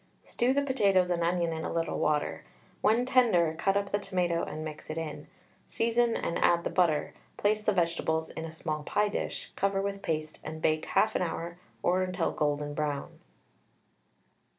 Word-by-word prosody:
Stew 245 +2 +1
the 280 +1 +2
potatoes 195 -9 +3
and 170 -1 0
onion 170 -1 +1
in 160 0 -4
a - - -3
little 165 -1 -1
water; 150 -1 0 0.4
when 230 +3 +3
tender, 225 - +4
cut 195 +4 +1
up 200 0 -2
the 205 - +1
tomato 180 -4 0
and 155 +1 -5
mix 155 -1 -8
it 155 - -4
in, 160 -2 -5 0.4
season 235 0 +1
and 170 - -2
add 170 0 +3
the - - -2
butter; 160 -5 +2 0.2
place 210 +1 +2
the 210 - +2
vegetables 165 -3 0
in - - -6
a 165 - -6
small 155 -1 -3
pie 205 +7 +1
dish, - - -4
cover 195 0 +1
with 200 0 -2
paste, 155 -2 -3
and 155 +1 -6
bake 155 0 +1
1/2 220 -2 +2
hour 170 0 -3 0.2
or 185 +1 +3
until 185 -1 0
golden 145 0 -1
brown. 145 -2 -3
175 Hz, 175 wpm, -29 LUFS, 160-200 Hz, 0.4 s, tender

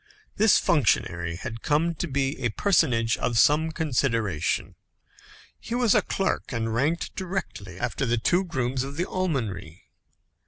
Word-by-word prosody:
This 220 0 +5
functionary 85 - +1
had 115 +5 -7
come 160 +3 +1
to 165 - -4
be 140 0 -1
a 120 - 0
personage 115 - +2
of 120 - -1
some 155 +7 +4
consideration. 120 - -1 0.9
He 230 - -5
was 240 -4 +3
a - - +4
clerk, 195 - -2
and 115 -2 -2
ranked 150 +8 -1
directly 175 - -5
after 135 - -2
the 120 +1 +1
two 175 +11 +2
grooms 130 -6 -2
of 140 +2 -7
the 175 - 0
almonry. 115 - -3
135 Hz, 145 wpm, -26 LUFS, 115-170 Hz, 0.9 s, This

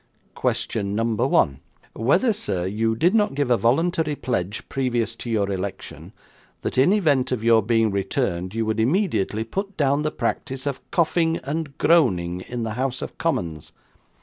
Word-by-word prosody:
'Question 100 -2 -1
number 115 0 +1
one. 70 0 +2 0.3
Whether, 175 - +2
sir, 95 - -2
you 110 +4 0
did 175 - +2
not 210 -10 +2
give 140 -3 0
a - - +6
voluntary 155 +6 +1
pledge 105 -8 -3
previous 120 -4 -1
to 120 - -6
your 100 -3 0
election, 95 0 -6 0.5
that - - -1
in 140 +8 +5
event 150 -12 +2
of 120 -4 -1
your 115 -1 +5
being 115 0 +2
returned, 95 -2 -2
you 115 0 0
would 110 0 -1
immediately 115 - +1
put 195 - -5
down 140 0 +2
the 155 - 0
practice 135 -3 -3
of 140 -2 -3
coughing 165 0 +2
and 145 +1 -4
groaning 90 - +2
in 120 -1 -4
the 110 - -3
House 130 +1 -2
of - - -7
Commons. 80 -4 -2
120 Hz, 165 wpm, -23 LUFS, 110-150 Hz, 0.5 s, a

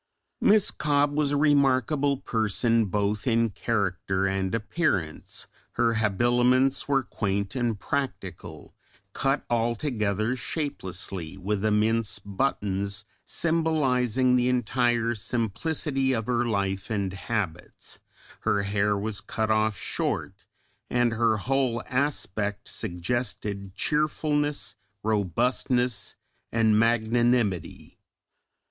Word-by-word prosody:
Miss 210 -1 +5
Cobbe 145 -1 +1
was 150 -1 +1
a 145 - +2
remarkable 140 -1 +3
person 115 -1 +1
both 105 +3 -1
in 115 -2 +2
character 95 -3 -1
and 95 +1 0
appearance, 105 - -2 0.3
her 115 -1 +2
habiliments 120 +5 +2
were 135 -2 +2
quaint 100 -3 -2
and 120 -5 -1
practical, 140 +3 -4 0.4
cut 135 +1 0
altogether 115 -2 0
shapelessly 95 - -4
with 100 +2 -2
immense 110 +1 +2
buttons 100 -2 -2 0.2
symbolising 130 -7 +2
the 125 0 +3
entire 120 -1 +1
simplicity 130 - 0
of 115 -3 -1
her 120 0 +1
life 100 -4 -1
and 100 -4 -1
habits, 95 -3 -4 0.4
her 100 - +1
hair 100 +1 +1
was 105 0 -3
cut 110 +1 -1
off 110 -2 +2
short, - - -2 0.6
and 120 -1 +2
her 115 -1 +2
whole 125 +1 0
aspect 110 -7 -2
suggested 100 0 -2
cheerfulness, 150 -3 0 0.3
robustness, 115 +3 0 0.4
and 110 -2 +3
magnanimity. 115 -3 +1
115 Hz, 100 wpm, -26 LUFS, 100-130 Hz, 0.6 s, Miss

